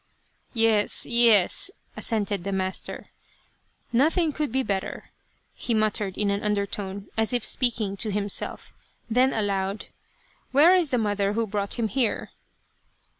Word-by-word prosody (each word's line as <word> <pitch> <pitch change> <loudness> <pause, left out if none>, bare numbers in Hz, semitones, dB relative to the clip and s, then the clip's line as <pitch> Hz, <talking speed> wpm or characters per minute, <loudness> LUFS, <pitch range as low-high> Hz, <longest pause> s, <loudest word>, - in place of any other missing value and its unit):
" - - -40 0.2
Yes, 210 -1 +2
yes," 235 - +4 0.3
assented 205 -4 -1
the 200 - -3
master 190 -1 -3 0.4
" - - -43 0.3
nothing 315 +6 +2
could 300 -3 -3
be 265 +2 0
better," 195 -5 -4 0.4
he 235 - -2
muttered, 215 -3 0
in 205 -1 +1
an 200 +1 -1
undertone, 200 -1 -3
as 225 +2 +1
if 245 -2 -1
speak 245 -2 +1
ing 200 -2 -3
to 220 - -1
himself; 205 0 -2 0.4
and 220 - -3
then 260 +1 +5
aloud, 200 -1 -2 0.3
" - - -37
where 310 +7 +7
is 355 -5 +2
the 250 - +1
mother 205 -2 0
who 230 +1 0
brought 200 -1 -3
him 230 -2 -1
here 230 +1 -1
215 Hz, 155 wpm, -25 LUFS, 200-240 Hz, 0.4 s, where